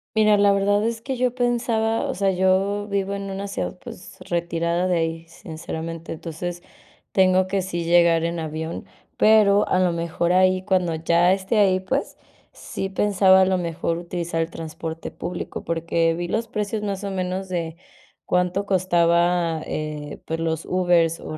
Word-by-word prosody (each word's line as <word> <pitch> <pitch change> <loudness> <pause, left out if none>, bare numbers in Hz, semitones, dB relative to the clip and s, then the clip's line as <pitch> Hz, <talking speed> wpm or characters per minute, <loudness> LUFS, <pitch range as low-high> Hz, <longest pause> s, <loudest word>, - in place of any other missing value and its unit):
Mira, 215 -1 +5
la 200 0 +5
verdad 200 +1 +2
es 225 0 -2
que 265 +2 -3
yo 250 0 +1
pensaba 235 -2 0
O - - -2
sea, 195 +1 +1
yo 190 +3 +1
vivo 200 -1 -1
en 200 0 -5
una 195 +1 -4
ciudad, 90 - -4
pues, - - -11
retirada 170 +1 0
de 180 - +1
ahí, 165 0 -2
sinceramente, 165 0 -7
entonces, 170 +2 -6 0.5
tengo 185 -1 +3
que 195 0 0
sí 175 -2 -3
llegar 170 -1 +4
en 170 0 -2
avión, 160 +1 -5 0.3
pero 210 -2 +5
a 185 - +2
lo 180 -1 +3
mejor 170 +1 -1
ahí 185 0 +3
Cuando 180 -3 +1
ya 170 +3 +3
esté 195 +3 -1
ahí 190 -2 +4
pues, 260 +10 -3 0.4
sí 195 - -5
pensaba 190 -1 +4
a - - +5
lo 190 0 +1
mejor 170 -1 -2
utilizar 170 -1 -3
el 165 - -2
transporte 165 0 -6
público, 175 0 -6
porque 165 0 0
vi 175 +1 -3
los 225 +5 -2
precios 210 -2 -3
más 200 -1 -3
o 200 - -3
menos 185 0 -3
de 165 -3 -3 0.5
cuánto 180 +2 0
costaba, 175 -3 +2
eh, 150 -1 -5
pues 165 0 -3
los 160 -1 -2
Ubers 175 -3 +2
o 155 - -7
180 Hz, 170 wpm, -23 LUFS, 165-195 Hz, 0.5 s, Mira